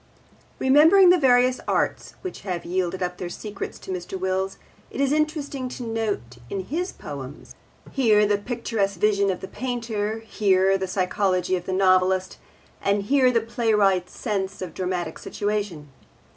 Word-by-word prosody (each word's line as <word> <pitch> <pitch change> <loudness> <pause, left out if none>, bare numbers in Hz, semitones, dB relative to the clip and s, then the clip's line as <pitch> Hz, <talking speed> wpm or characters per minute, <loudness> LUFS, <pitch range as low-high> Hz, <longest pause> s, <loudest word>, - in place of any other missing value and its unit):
Remembering 320 +8 +6
the 360 - +4
various 250 -2 +4
arts - - -1
which 370 - -6
have 180 -4 -4
yielded 185 +1 -1
up 180 0 -4
their 175 - -4
secrets 205 +2 -6
to - - -8
Mr. 185 +1 -5
Wills, 190 +1 -1 0.3
it - - -8
is 275 -1 +2
interesting 295 -4 -1
to 250 - -7
note 215 - -3
in 195 - -2
his 335 - -3
poems, 140 -1 -9 0.4
here 215 -6 +4
the 205 0 +1
picturesque 220 -4 -2
vision 200 -1 +3
of 185 - -2
the 190 - -6
painter, 230 -4 -3
here 195 -3 +2
the 190 0 -2
psychology 185 0 0
of 175 -1 -5
the - - -1
novelist, 185 0 +2 0.4
and 200 0 +1
here 260 +3 +4
the 235 -2 +2
playwright's 210 -5 +1
sense 195 -3 -2
of 180 -4 -6
dramatic 180 -3 -3
situation. 205 -8 -3
200 Hz, 155 wpm, -24 LUFS, 185-240 Hz, 0.4 s, Remembering